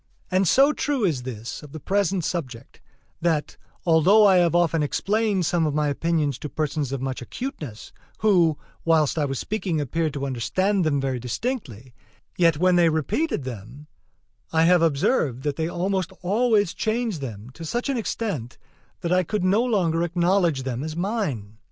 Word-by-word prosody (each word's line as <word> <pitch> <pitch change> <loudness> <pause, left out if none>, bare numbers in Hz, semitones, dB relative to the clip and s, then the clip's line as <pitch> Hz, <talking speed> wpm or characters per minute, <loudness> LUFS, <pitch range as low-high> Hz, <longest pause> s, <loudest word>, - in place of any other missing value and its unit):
And 185 0 +2
so 275 - +5
true 280 -8 0
is 150 -9 0
this 115 -2 -6
of 150 -2 -13
the 155 - -6
present 190 +2 0
subject 130 -10 -5 0.4
that, 160 -3 0 0.3
though 180 +6 +5
I 190 -2 +6
have 175 -1 +3
often 165 -2 +2
explained 200 +5 0
some 165 0 +1
of 150 - -2
my 150 -1 +1
opinions 150 -2 0
to 150 - -6
persons 150 -3 -2
of 135 -1 -3
much 130 -1 -3
acuteness, 145 - -7 0.3
who, 175 -8 +4 0.3
whilst 160 -2 +2
I 150 - +2
was 135 -1 -3
speaking, 190 - -2
appeared 155 +2 -1
to 140 -1 -2
understand 140 - 0
them 145 -3 +1
very 135 -2 -2
distinctly, 125 - -4 0.4
yet, 165 -4 +3
when 180 +2 +3
they 170 -1 +5
repeated 160 - -1
them, 125 +4 -8 0.7
I 160 0 +3
have 175 0 +5
observed 140 - +1
that 145 -2 -1
they 160 +2 -1
almost 185 +1 -1
always 205 -1 +2
changed 220 -6 -1
them 115 -2 -7
to 165 - -10
such 240 - -2
an 275 - 0
extent 200 - -3 0.4
that 170 -1 -2
I 185 - +4
could 195 +2 -2
no 200 +5 +3
longer 180 -9 +1
acknowledge 175 -3 +1
them 130 0 -3
as 155 0 -5
mine. 165 - -3
165 Hz, 170 wpm, -24 LUFS, 140-195 Hz, 0.7 s, I